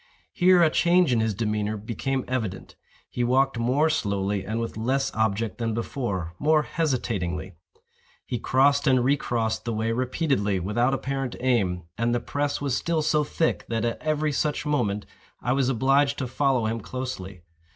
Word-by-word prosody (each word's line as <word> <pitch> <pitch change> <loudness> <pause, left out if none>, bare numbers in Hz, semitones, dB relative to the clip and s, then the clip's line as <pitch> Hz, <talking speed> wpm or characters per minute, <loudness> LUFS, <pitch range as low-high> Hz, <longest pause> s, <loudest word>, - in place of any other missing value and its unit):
Here 180 -1 +5
a 160 - +4
change 175 -4 +3
in 115 - +2
his 110 -2 0
demeanor 105 0 -1
became 120 +5 -3
evident. 110 -7 -4 0.3
He 125 - -2
walked 130 0 +2
more 130 +7 +2
slowly 100 -9 -1
and 110 +4 -3
with 115 - -4
less 130 +5 0
object 110 -1 -1
than 115 -2 -1
before—more 115 - 0
hesitatingly. 105 - -2 0.7
He 120 - -3
crossed 140 +4 +3
and 130 -2 +4
re 140 +3 +4
crossed 115 -5 -2
the 115 - -2
way 110 +1 0
repeatedly 125 - 0
without 120 +8 +1
apparent 135 -2 -3
aim; 100 -9 +1 0.2
and 120 +1 +1
the - - +1
press 145 +4 -2
was 140 -3 -1
still 165 +1 0
so 150 0 +2
thick 160 +2 0
that, 115 0 -1
at 115 - -2
every 155 0 0
such 150 +1 -1
movement, 115 -9 0 0.3
I 125 - 0
was 135 -1 +1
obliged 135 +3 +2
to 130 - -2
follow 130 -1 +1
him 115 +1 -1
closely. 100 -8 -6
125 Hz, 165 wpm, -25 LUFS, 110-140 Hz, 0.7 s, Here